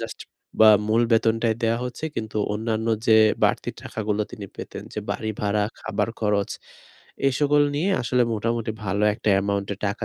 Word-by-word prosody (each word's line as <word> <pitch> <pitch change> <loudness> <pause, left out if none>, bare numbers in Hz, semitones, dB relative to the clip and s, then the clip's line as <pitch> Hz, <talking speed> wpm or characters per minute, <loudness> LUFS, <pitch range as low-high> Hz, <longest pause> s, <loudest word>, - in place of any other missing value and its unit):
Just - - -6 0.4
বা 110 - +9 0.2
মূল 115 +2 +3
বেতনটাই 115 0 +2
দেয়া 115 +1 +1
হচ্ছে। 125 +5 -6
কিন্তু 110 -1 -4 0.2
অন্যান্য 110 +1 -2 0.2
যে 110 -1 +6 0.3
বাড়তি - - +1
টাকাগুলো 105 -1 -2
তিনি 100 -2 -7
পেতেন, - - -7
যে - - -2
বাড়ি 110 - -2
ভাড়া, 105 0 +1 0.2
খাবার 110 +1 -2
খরচ 105 -2 +1 0.8
এসকল 145 +2 +3
নিয়ে 185 +6 +1
আসলে 125 +1 +2
মোটামুটি 115 +1 -2
ভালো 100 +2 -1
একটা 110 -1 -3
অ্যামাউন্টের 100 0 -1
টাকা 100 - -3
110 Hz, 155 wpm, -24 LUFS, 105-115 Hz, 0.8 s, বা